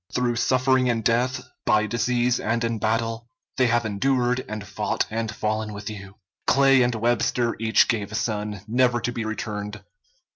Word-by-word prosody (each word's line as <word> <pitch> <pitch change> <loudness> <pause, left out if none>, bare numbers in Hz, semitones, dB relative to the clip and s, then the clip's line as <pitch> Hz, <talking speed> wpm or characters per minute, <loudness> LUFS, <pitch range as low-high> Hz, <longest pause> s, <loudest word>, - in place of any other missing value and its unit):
Through 120 -1 0
suffering 130 +1 +2
and 115 -2 0
death, 125 +3 0 0.2
by 110 0 +3
disease 120 +2 +1
and 115 +2 -1
in 115 -1 -1
battle, 115 +2 -1 0.3
they 130 - +4
have 120 0 +1
endured 125 +4 +1
and 110 -1 -5
fought - - -1
and 115 0 -2
fallen 110 0 -2
with 105 +1 -6
you. 100 -2 -10 0.3
Clay 135 -1 +5
and 120 -1 +2
Webster 120 +1 +1
each 110 0 +4
gave 105 -3 -1
a - - -5
son, 105 -2 -2
never 120 +1 +2
to 120 +1 -2
be 115 -2 -4
returned. 105 -2 -5
115 Hz, 170 wpm, -24 LUFS, 110-125 Hz, 0.3 s, Clay